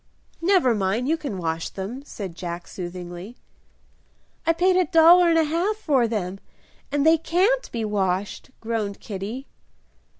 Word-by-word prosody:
"Never 340 -8 +4
mind, 210 +4 0
you 320 - +3
can 285 -11 -5
wash 165 -2 -2
them," 215 +8 -6
said 200 - -7
Jack, 175 0 -6
soothingly. 180 +4 -7 1.1
"I - - +6
paid 365 +2 +3
a 365 -1 +4
dollar 335 +3 +6
and 330 - +4
a 325 - +4
half 340 +7 0
for 285 - +1
them, 195 -4 -3 0.5
and 290 0 +1
they 320 0 +5
can't 400 +10 +1
be 230 -2 -2
washed," 195 +1 -2
groaned 220 -3 -3
Kitty. 215 +6 -6
235 Hz, 145 wpm, -24 LUFS, -, 1.1 s, I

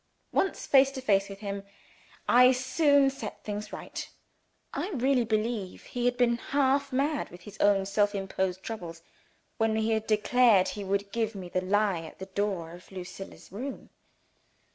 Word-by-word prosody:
Once 385 - 0
face 270 -1 +6
to 275 -1 -6
face 200 -6 +2
with 195 +1 -9
him, 200 -1 -4 0.7
I 250 +1 +7
soon 275 +2 +3
set 230 -6 -7
things 210 0 -5
right. - - -6 0.6
I 370 - -2
really 255 -1 +2
believe 215 -3 -2
he 245 -1 -4
had 245 0 +2
been 235 -1 +3
half 280 +2 +1
mad 280 +3 0
with 175 - -13
his 205 +3 -11
own 200 -1 +4
self 205 +1 +1
imposed 190 -1 -2
troubles, 170 -7 -7 0.6
when 225 -1 +2
he 220 +1 +1
had 220 0 0
declared 215 -2 +4
he 205 - -5
would 200 +1 -1
give 225 -1 -1
me 185 -2 -7
the 185 - 0
lie 195 -2 +1
at 160 - -11
the 190 - -7
door 190 -4 -2
of 175 +3 -13
Lucilla's 190 +1 -9
room. 255 +8 -6
215 Hz, 165 wpm, -29 LUFS, 195-250 Hz, 0.7 s, I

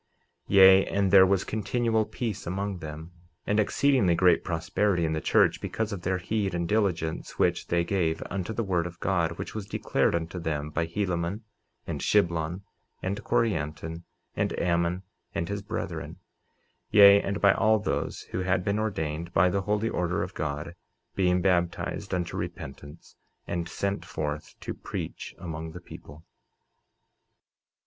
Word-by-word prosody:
49:30 - - 0
Yea, 95 0 +8
and 100 -2 +1
there 95 -1 +8
was 95 0 +2
continual 110 0 0
peace 105 -6 -4
among 95 +1 -3
them, 80 +1 -8 0.3
and 105 +1 +1
exceedingly 110 -4 +3
great 90 -1 +4
prosperity 85 +2 0
in 80 - 0
the 80 - -2
church - - +3
because 110 -1 -2
of 95 - -5
their 95 +1 0
heed 95 0 -1
and 85 -1 -1
diligence 90 -6 -1
which - - +1
they 85 0 +1
gave 85 -3 0
unto 95 +1 -3
the 115 +1 -2
word 90 -4 0
of 85 0 -11
God, 85 -4 +1
which - - -6
was 105 -2 -5
declared - - +1
unto 85 +2 -3
them 75 -2 -3
by 80 +2 -1
Helaman, 90 +2 -2 0.4
and - - -4
Shiblon, 85 -3 +1 0.4
and 95 +2 -3
Corianton, 80 -5 -1 0.3
and - - -1
Ammon 85 +1 0 0.3
and 85 - -1
his 100 0 -3
brethren, - - -5 0.7
yea, 100 -1 +8
and 100 +1 -2
by 100 -1 +6
all 110 0 +3
those 105 - -2
who 90 - -2
had 90 0 +1
been 100 +1 +1
ordained 85 -6 -2
by 90 +2 +4
the 100 - 0
holy 105 +3 0
order 90 -3 -1
of - - -6
God, 75 +2 -4 0.4
being 90 -1 +2
baptized 90 +2 0
unto 90 -2 -2
repentance, 75 +4 -8 0.3
and 85 -1 -3
sent 100 -3 -2
forth 75 -3 -5
to - - -4
preach - - -6
among 80 -2 -6
the 90 - -7
people. 75 -3 -12
90 Hz, 155 wpm, -27 LUFS, 85-100 Hz, 0.7 s, Yea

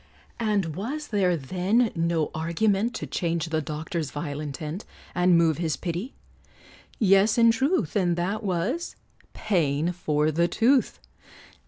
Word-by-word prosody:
And 205 -8 0
was 270 - -4
there 185 -5 +2
then 190 - +1
no 165 -2 0
argument 195 +8 0
To - - -4
change 170 -2 -2
the 160 -1 0
doctor's 155 +1 -4
vile 145 0 -5
intent, 155 +5 -5 0.3
And 180 0 +4
move 165 -2 +2
his 160 -3 -1
pity? 180 +9 -4 0.8
yes, 200 +1 +4
in 230 -1 +6
truth, 235 - 0
And 180 -4 +2
that 190 +5 -2
was 205 - -2 0.4
paying 165 -5 0
for 155 -3 0
the 170 +3 +2
tooth. 250 +7 +2
175 Hz, 135 wpm, -26 LUFS, 160-215 Hz, 0.8 s, in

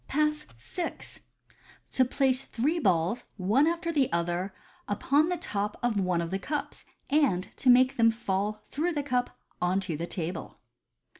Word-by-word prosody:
Pass 300 +1 +1
VI. 330 - -4 1.0
To 260 - +4
Place 260 0 +2
three 290 +8 -1
Balls 185 - +1
one 215 +11 +3
after 335 0 -1
the 280 -4 +2
other 175 +3 -1 0.4
upon 280 +9 +2
the 360 0 -1
top 210 -9 -3
of 235 -4 +1
one 180 -3 +1
of 165 0 -4
the 195 - -1
Cups, 295 +8 -4 0.3
and 270 -12 +2
to 260 - +2
make 255 +1 +6
them 230 -1 +6
fall 210 -1 -2
through 335 +5 0
the 290 -2 -1
Cup 250 -3 -1 0.2
on 180 +2 +2
to 180 -4 -3
the 170 +3 -4
Table. 175 -1 -5
235 Hz, 160 wpm, -28 LUFS, 185-290 Hz, 1.0 s, make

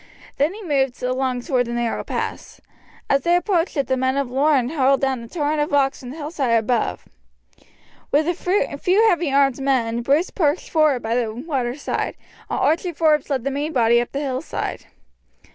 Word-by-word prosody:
Then 305 +7 +1
he 435 - -9
moved 270 -6 0
along 255 0 -1
towards 250 -5 0
the 235 - -3
narrow 240 -1 -1
pass. - - -5 0.5
As 275 0 +2
they 345 +5 +3
approached 355 -2 0
it 280 - +1
the 260 - 0
men 260 +1 0
of 275 -3 -1
Lorne 270 -2 +2
hurled 275 -3 +2
down 265 -3 0
a 230 - -9
torrent 300 +2 -1
of 295 - -1
rocks 275 -1 +2
from 250 - -9
the 280 - -8
hillside 290 -6 0
above. 225 +1 -1 1.0
With 300 +2 +2
a 350 - +2 0.5
few 400 +8 +3
heavy 345 -7 +1
armed 275 -2 +3
men 240 -4 0
Bruce 285 +8 +1
pushed 310 -2 0
forward 305 -6 +3
by 225 +1 -1
the 235 -2 0
water 250 0 -3
side, 290 - -3 0.3
while - - -2
Archie 345 +3 +1
Forbes 305 -2 +2
led 265 -4 -1
the 275 - -1
main 290 +3 -3
body 235 -2 +4
up 240 - -5
the 280 - -3
hillside. 270 +1 -4
275 Hz, 190 wpm, -21 LUFS, 250-310 Hz, 1.0 s, body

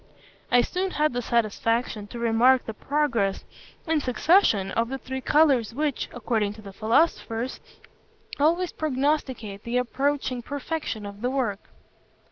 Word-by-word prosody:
I 245 - +5
soon 375 +6 -2
had 305 -5 +1
the 245 - -1
satisfaction 230 -1 0
to 235 - -9
remark 235 +3 +4
the 225 - -5
progress 235 -8 0 0.4
and 320 -3 +1
succession 250 - +3
of 230 +3 0
the 270 - -3
three 265 0 -6
colours 270 -7 +3
which, 295 -1 -1
according 220 -4 -1
to 215 - -13
the 195 -1 -10
philosophers, 230 - 0 0.8
always 340 +5 +2
prognosticate 265 -8 -1
the 235 +1 -1
approaching 265 0 -1
perfection 275 -5 -4
of 200 0 -9
the 245 - 0
work. 245 -7 -2
250 Hz, 135 wpm, -25 LUFS, 225-290 Hz, 0.8 s, I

